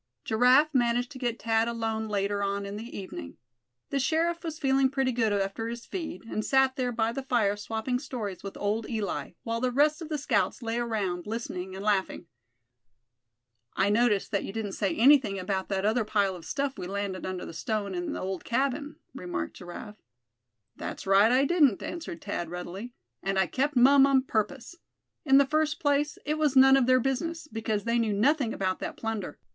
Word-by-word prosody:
Giraffe 250 Hz, +7 st, +4 dB
managed 245 Hz, 0 st, +1 dB
to 260 Hz, -, -9 dB
get 240 Hz, -2 st, -2 dB
Thad 225 Hz, 0 st, +1 dB
alone 225 Hz, -1 st, -2 dB
later 200 Hz, -1 st, -1 dB
on 200 Hz, 0 st, -1 dB
in 200 Hz, +1 st, -6 dB
the 225 Hz, +3 st, -7 dB
evening. 90 Hz, -, -8 dB, 0.5 s
The 275 Hz, -, +1 dB
sheriff 335 Hz, +5 st, 0 dB
was 320 Hz, -2 st, -4 dB
feeling 270 Hz, -2 st, +3 dB
pretty 265 Hz, -1 st, 0 dB
good 230 Hz, -3 st, +1 dB
after 200 Hz, +2 st, -1 dB
his 235 Hz, 0 st, -6 dB
feed, 325 Hz, -, -6 dB
and 215 Hz, -1 st, -3 dB
sat 265 Hz, +1 st, +3 dB
there 255 Hz, -3 st, -1 dB
by 225 Hz, -1 st, 0 dB
the 270 Hz, -, -4 dB
fire 235 Hz, -6 st, +1 dB
swapping 225 Hz, +4 st, -2 dB
stories 220 Hz, -9 st, -5 dB
with 195 Hz, -, -7 dB
old 215 Hz, +2 st, -1 dB
Eli, 220 Hz, -4 st, -3 dB
while 230 Hz, 0 st, -2 dB
the 255 Hz, -, +2 dB
rest 295 Hz, +5 st, +2 dB
of 320 Hz, -, -7 dB
the 305 Hz, -, -1 dB
scouts 280 Hz, -2 st, 0 dB
lay 230 Hz, +1 st, -1 dB
around, 205 Hz, -7 st, -2 dB
listening 190 Hz, -5 st, -4 dB
and 195 Hz, +2 st, -6 dB
laughing. 195 Hz, -4 st, 0 dB, 1.5 s
"I 195 Hz, +2 st, +2 dB
noticed 215 Hz, -3 st, +2 dB
that 200 Hz, -, 0 dB
you -, -, -5 dB
didn't 210 Hz, -1 st, -4 dB
say 195 Hz, -3 st, -1 dB
anything 255 Hz, -5 st, +5 dB
about 190 Hz, 0 st, -2 dB
that 195 Hz, 0 st, -1 dB
other 220 Hz, +2 st, +2 dB
pile 205 Hz, -3 st, +1 dB
of 170 Hz, -, -11 dB
stuff 280 Hz, -5 st, -2 dB
we 180 Hz, -, -5 dB
landed 195 Hz, -1 st, -3 dB
under 185 Hz, -1 st, -4 dB
the -, -, -8 dB
stone 205 Hz, +3 st, -2 dB
in 175 Hz, -1 st, -3 dB
the -, -, -4 dB
old 190 Hz, -1 st, -4 dB
cabin?" 280 Hz, +4 st, -1 dB, 0.2 s
remarked 175 Hz, -, -5 dB
Giraffe. 210 Hz, +5 st, -9 dB, 0.7 s
"That's -, -, -6 dB
right, 195 Hz, +3 st, +5 dB
I 260 Hz, +2 st, +4 dB
didn't," 285 Hz, -, +3 dB
answered 320 Hz, -, -6 dB
Thad, 170 Hz, -, -3 dB
readily; 185 Hz, +7 st, -7 dB, 0.3 s
"and 195 Hz, 0 st, -1 dB
I 190 Hz, -, +4 dB
kept 280 Hz, +8 st, -1 dB
mum 270 Hz, +2 st, +7 dB
on 270 Hz, -1 st, +3 dB
purpose. 235 Hz, +4 st, -2 dB, 0.5 s
In 270 Hz, -1 st, +6 dB
the 280 Hz, -, +6 dB
first 305 Hz, +1 st, 0 dB
place, 290 Hz, 0 st, +1 dB
it 305 Hz, +1 st, -1 dB
was 295 Hz, -3 st, +2 dB
none 265 Hz, 0 st, +8 dB
of 265 Hz, -2 st, +3 dB
their 255 Hz, 0 st, +5 dB
business, 305 Hz, +6 st, -2 dB
because 220 Hz, -4 st, -2 dB
they 235 Hz, +1 st, +1 dB
knew 220 Hz, -3 st, +1 dB
nothing 260 Hz, +4 st, +2 dB
about 185 Hz, -1 st, -1 dB
that -, -, -5 dB
plunder. 220 Hz, -8 st, -4 dB
230 Hz, 195 wpm, -28 LUFS, 200-270 Hz, 1.5 s, none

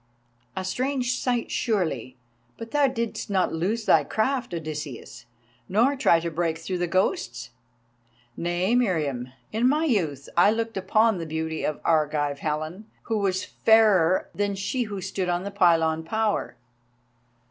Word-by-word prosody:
"A 190 Hz, -, -3 dB
strange 255 Hz, +4 st, -1 dB
sight, 245 Hz, -2 st, -1 dB
surely. 160 Hz, -, -1 dB, 0.4 s
But 230 Hz, 0 st, -8 dB
thou 290 Hz, -1 st, +3 dB
didst 235 Hz, -5 st, -3 dB
not 190 Hz, -2 st, +1 dB
lose 205 Hz, +8 st, -1 dB
thy -, -, +5 dB
craft, 255 Hz, +4 st, -1 dB
Odysseus, 155 Hz, -9 st, -6 dB, 0.4 s
nor 235 Hz, +9 st, +3 dB
try 205 Hz, -11 st, +4 dB
to 170 Hz, 0 st, -3 dB
break 165 Hz, 0 st, -1 dB
through 180 Hz, +3 st, -4 dB
the 175 Hz, -, 0 dB
ghosts?" 125 Hz, -, -1 dB, 0.8 s
"Nay, 175 Hz, +5 st, 0 dB
Meriamun. 150 Hz, -, 0 dB, 0.2 s
In 235 Hz, +4 st, +2 dB
my 305 Hz, +3 st, +2 dB
youth 160 Hz, -, -1 dB
I 175 Hz, +4 st, +6 dB
looked 225 Hz, +1 st, -1 dB
upon 210 Hz, +2 st, +2 dB
the 165 Hz, -, -5 dB
beauty 160 Hz, 0 st, -3 dB
of 150 Hz, -, -2 dB
Argive 150 Hz, -3 st, +1 dB
Helen, 155 Hz, +8 st, -4 dB, 0.2 s
who 225 Hz, -2 st, -1 dB
was 190 Hz, -2 st, 0 dB
fairer 205 Hz, -6 st, +4 dB
than 205 Hz, -1 st, -1 dB
she 220 Hz, +6 st, -2 dB
who 200 Hz, -3 st, -6 dB
stood 190 Hz, 0 st, -3 dB
upon 175 Hz, +1 st, 0 dB
the 200 Hz, -, -5 dB
pylon 165 Hz, -4 st, +3 dB
tower. 220 Hz, +4 st, -1 dB
185 Hz, 145 wpm, -25 LUFS, 160-225 Hz, 0.8 s, I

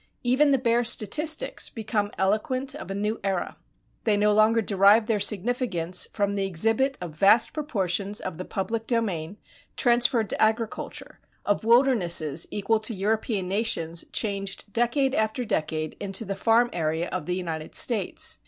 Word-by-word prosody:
Even 260 Hz, +4 st, +3 dB
the 275 Hz, -, +4 dB
bare 240 Hz, -1 st, +1 dB
statistics 305 Hz, -, 0 dB
become 215 Hz, -2 st, -2 dB
eloquent 220 Hz, +7 st, 0 dB
of -, -, -9 dB
a 195 Hz, -, -4 dB
new 210 Hz, +2 st, -2 dB
era. 190 Hz, -2 st, -2 dB, 0.5 s
They 210 Hz, -3 st, +2 dB
no 210 Hz, 0 st, +3 dB
longer 215 Hz, +2 st, +4 dB
derive 200 Hz, +2 st, +4 dB
their 220 Hz, -2 st, 0 dB
significance 200 Hz, -4 st, 0 dB
from 200 Hz, -1 st, -1 dB
the 200 Hz, -1 st, -1 dB
exhibit 225 Hz, +9 st, +1 dB
of 175 Hz, -3 st, -7 dB
vast 200 Hz, +8 st, +4 dB
proportions 200 Hz, -, -2 dB
of 185 Hz, -3 st, -6 dB
the -, -, -3 dB
public 225 Hz, +3 st, -4 dB
domain 200 Hz, -7 st, -1 dB, 0.4 s
transferred 240 Hz, -2 st, +3 dB
to -, -, -3 dB
agriculture, 220 Hz, +1 st, -2 dB, 0.3 s
of 205 Hz, +1 st, 0 dB
wildernesses 190 Hz, -, +2 dB
equal 210 Hz, +2 st, 0 dB
to 220 Hz, +1 st, -2 dB
European 205 Hz, 0 st, -1 dB
nations 180 Hz, -5 st, -1 dB
changed 200 Hz, -1 st, -3 dB
decade 260 Hz, +3 st, +1 dB
after 220 Hz, +1 st, 0 dB
decade 155 Hz, -4 st, -2 dB
into 200 Hz, +2 st, -2 dB
the 195 Hz, -, -3 dB
farm 230 Hz, +4 st, +2 dB
area 160 Hz, +1 st, -1 dB
of 180 Hz, -4 st, -4 dB
the 180 Hz, -, -1 dB
United 165 Hz, -4 st, -5 dB
States. 215 Hz, -7 st, +1 dB
210 Hz, 155 wpm, -25 LUFS, 190-235 Hz, 0.5 s, the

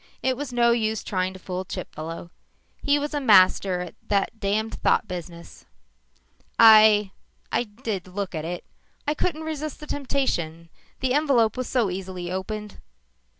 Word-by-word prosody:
It 260 Hz, 0 st, +2 dB
was 280 Hz, 0 st, -5 dB
no 240 Hz, -1 st, +3 dB
use 220 Hz, -2 st, 0 dB
trying 185 Hz, -1 st, -1 dB
to -, -, -9 dB
fool 185 Hz, 0 st, -5 dB
Chipfellow. 170 Hz, -2 st, -7 dB, 0.5 s
He 285 Hz, 0 st, +3 dB
was 290 Hz, +1 st, -3 dB
a 290 Hz, -, -1 dB
master 190 Hz, -5 st, +5 dB
at 180 Hz, -, -7 dB
that 205 Hz, +3 st, 0 dB
damned 215 Hz, +2 st, -1 dB
thought -, -, +2 dB
business. 170 Hz, -2 st, -8 dB, 0.9 s
"I 215 Hz, -3 st, +7 dB, 0.4 s
I 245 Hz, -, +1 dB
did 210 Hz, -4 st, -5 dB
look 190 Hz, 0 st, -4 dB
at 155 Hz, -2 st, -3 dB
it. 175 Hz, +2 st, -5 dB, 0.4 s
I 295 Hz, -, +2 dB
couldn't 315 Hz, 0 st, -2 dB
resist 310 Hz, -2 st, -5 dB
the 300 Hz, -, -8 dB
temptation. 175 Hz, -, -2 dB, 0.3 s
The 260 Hz, -1 st, +1 dB
envelope 265 Hz, -7 st, +3 dB
was 255 Hz, -1 st, -4 dB
so 235 Hz, -7 st, +1 dB
easily 180 Hz, -1 st, -5 dB
opened." 210 Hz, +2 st, -5 dB
210 Hz, 150 wpm, -25 LUFS, 185-255 Hz, 0.9 s, I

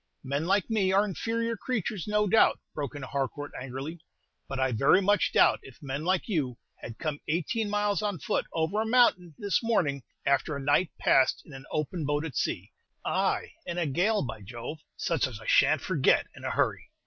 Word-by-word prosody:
"Men 140 Hz, +4 st, -2 dB
like 195 Hz, 0 st, +2 dB
me 205 Hz, -4 st, +1 dB
are 195 Hz, +1 st, +5 dB
very 210 Hz, -, -1 dB
inferior 230 Hz, +4 st, -2 dB
creatures, 215 Hz, -5 st, -3 dB
no 210 Hz, 0 st, +2 dB
doubt," 215 Hz, +3 st, +4 dB, 0.2 s
broke 145 Hz, -2 st, -4 dB
in 145 Hz, -, -6 dB
Harcourt, 140 Hz, +2 st, -3 dB
angrily; 135 Hz, +6 st, -6 dB, 0.5 s
"but 135 Hz, -, -4 dB
I 130 Hz, -1 st, +2 dB
very 135 Hz, -, +4 dB
much 205 Hz, +1 st, +2 dB
doubt -, -, +5 dB
if 130 Hz, -4 st, -14 dB
men 140 Hz, +1 st, -4 dB
like 185 Hz, +2 st, +1 dB
you 145 Hz, -, -1 dB, 0.2 s
had 115 Hz, -1 st, -9 dB
come 150 Hz, -2 st, -3 dB
eighteen 190 Hz, +7 st, -1 dB
miles 205 Hz, 0 st, +1 dB
on 205 Hz, -3 st, -1 dB
foot -, -, -1 dB
over 165 Hz, +6 st, 0 dB
a -, -, -1 dB
mountain 200 Hz, -9 st, +3 dB
this 200 Hz, -2 st, 0 dB
morning, 170 Hz, -, +1 dB, 0.2 s
after 140 Hz, +2 st, +1 dB
a -, -, -4 dB
night 145 Hz, +5 st, +2 dB
passed 130 Hz, -, +3 dB
in 150 Hz, -, -13 dB
an 135 Hz, 0 st, -10 dB
open 155 Hz, +2 st, -2 dB
boat 145 Hz, +2 st, 0 dB
at 145 Hz, -7 st, -6 dB
sea, -, -, -2 dB, 0.3 s
ay, -, -, 0 dB, 0.2 s
in 170 Hz, -, -3 dB
a 175 Hz, -, +1 dB
gale, 190 Hz, +10 st, +1 dB
by 110 Hz, -4 st, -6 dB
Jove, 120 Hz, +9 st, -7 dB, 0.2 s
such 160 Hz, -5 st, 0 dB
as 115 Hz, -5 st, -8 dB
I -, -, -12 dB
sha' -, -, +5 dB
n't -, -, -11 dB
forget -, -, +2 dB
in -, -, -10 dB
a -, -, 0 dB
hurry." -, -, 0 dB
160 Hz, 205 wpm, -28 LUFS, 140-205 Hz, 0.5 s, are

